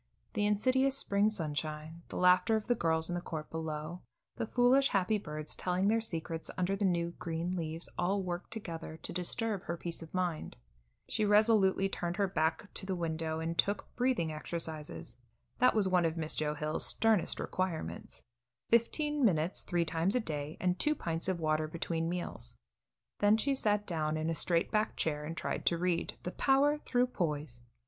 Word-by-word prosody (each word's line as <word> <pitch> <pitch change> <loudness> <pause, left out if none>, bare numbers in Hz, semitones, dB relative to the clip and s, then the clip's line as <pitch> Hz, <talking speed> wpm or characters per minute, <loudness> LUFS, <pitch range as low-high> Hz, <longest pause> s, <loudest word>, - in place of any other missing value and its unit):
The 205 0 +1
insidious 260 +6 +3
spring 200 -3 +2
sunshine, 155 -3 -3
the - - -7
laughter 180 +5 +5
of 220 - -1
the 245 - +3
girls 160 -6 +1
in 175 - -3
the 175 - -2
court 155 -3 -6
below, 160 +1 -4 0.3
the 230 - -3
foolish 250 +4 +4
happy 200 0 +1
birds 155 -4 -2
telling 185 +2 +1
their 225 +1 +3
secrets 165 -5 -4
under 185 +2 +1
the 200 +1 0
new, 170 -2 +1
green 170 +2 -2
leaves, 165 -1 -3
all 195 +3 +1
worked 175 0 -4
together 165 -7 -6
to - - -7
disturb 195 +3 -2
her 170 - -3
peace 170 0 -5
of 160 - -10
mind. 180 -4 -2 0.5
She 215 - 0
resolutely 205 -2 +4
turned 175 -2 -3
her 200 -1 +2
back 160 +2 -1
to 190 - -6
the 190 - -1
window 160 -2 -2
and 165 +1 -2
took 205 +3 0
breathing 245 -11 +1
exercises. 155 - -4 0.4
That 255 -1 +5
was 210 -3 +4
one 180 -2 +3
of 165 0 -1
Miss 155 -1 -1
Joe 150 -1 -1
Hill's 150 +1 +1
sternest 220 -5 +2
requirements 165 - -3 0.5
fifteen 295 +5 +2
minutes 175 -5 +3
three 175 -2 0
times 165 +5 +1
a - - +4
day 150 -7 -3
and 180 0 0
two 305 0 +2
pints 165 - -2
of 185 -2 -1
water 155 -1 +1
between 165 +1 -2
meals. 175 0 -4 0.6
Then 205 +1 +5
she 275 +5 +1
sat 210 -5 +1
down 155 -4 0
in 160 +1 -1
a - - +1
straight 170 +1 +1
back 215 0 +1
chair 150 -2 -1
and 165 +3 -5
tried - - -2
to 170 - +3
read 175 0 0
"The 180 - -3
Power 285 +5 +3
Through 250 -4 +2
Poise." 150 - -3
175 Hz, 185 wpm, -32 LUFS, 160-210 Hz, 0.6 s, laughter